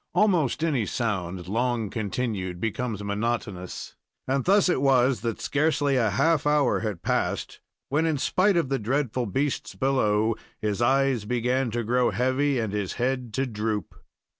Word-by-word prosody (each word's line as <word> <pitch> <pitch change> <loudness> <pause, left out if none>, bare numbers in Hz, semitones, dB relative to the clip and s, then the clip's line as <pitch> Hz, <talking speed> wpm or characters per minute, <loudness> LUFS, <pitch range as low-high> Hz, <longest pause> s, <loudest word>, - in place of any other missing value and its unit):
Almost 175 - +2
any 135 -11 +1
sound 95 -6 -2
long 115 0 -1
continued 100 -4 -3
becomes 110 0 -3
monotonous, 100 -3 -3 0.3
and 135 0 0
thus 195 +1 +4
it 175 -7 +1
was 130 -2 +3
that 115 -2 -3
scarcely 145 -1 +1
a 115 -4 +2
half 150 - +2
hour 150 -3 +3
had 105 -6 -4
passed - - -1 0.3
when, 155 +4 +1
in 155 -2 +1
spite 185 +7 +2
of 160 -6 +1
the 135 - 0
dreadful 125 +1 -1
beasts 135 +7 -2
below, 110 -5 +1 0.2
his 105 +1 -2
eyes 130 -2 +2
began 125 +2 0
to 120 +1 -2
grow 125 +2 +2
heavy 130 +3 +1
and 110 -4 -2
his 100 -3 -2
head 125 -1 -2
to 135 - +1
droop. 105 -4 -3
125 Hz, 155 wpm, -26 LUFS, 105-135 Hz, 0.3 s, thus